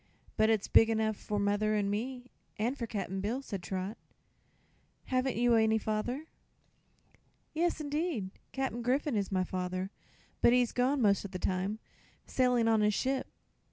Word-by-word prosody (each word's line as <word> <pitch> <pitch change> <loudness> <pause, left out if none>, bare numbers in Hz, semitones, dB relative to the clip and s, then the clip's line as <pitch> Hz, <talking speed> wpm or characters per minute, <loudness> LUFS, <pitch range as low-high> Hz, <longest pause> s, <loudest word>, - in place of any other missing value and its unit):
"But 220 0 +3
it's 220 -3 +2
big 225 - +6
enough 220 -1 +1
for 210 +1 -4
mother 205 +1 +1
and 200 -1 +1
me, 250 +4 -4 0.3
an' 230 +4 0
for 240 -5 -5
Cap'n 195 -3 -3
Bill," 235 +7 -2
said 200 -7 -5
Trot. 190 +4 -4 1.1
"Haven't 255 0 0
you 240 +1 +3
any 220 -1 +4
father?" 220 +7 -2 1.3
"Yes, 335 +1 +1
'ndeed; 295 - -2 0.2
Cap'n 265 -3 -2
Griffith 265 +4 +1
is 205 -3 -1
my 185 -1 +2
father; 185 +1 -3 0.5
but 235 - +6
he's 245 -1 +3
gone, 255 +1 +1
most 200 -2 +3
of 200 - -6
the - - -2
time, 190 +3 -1 0.5
sailin' 250 -3 +2
on 220 -1 +4
his 210 -1 +3
ship. 265 +3 0
220 Hz, 155 wpm, -31 LUFS, 200-255 Hz, 1.3 s, big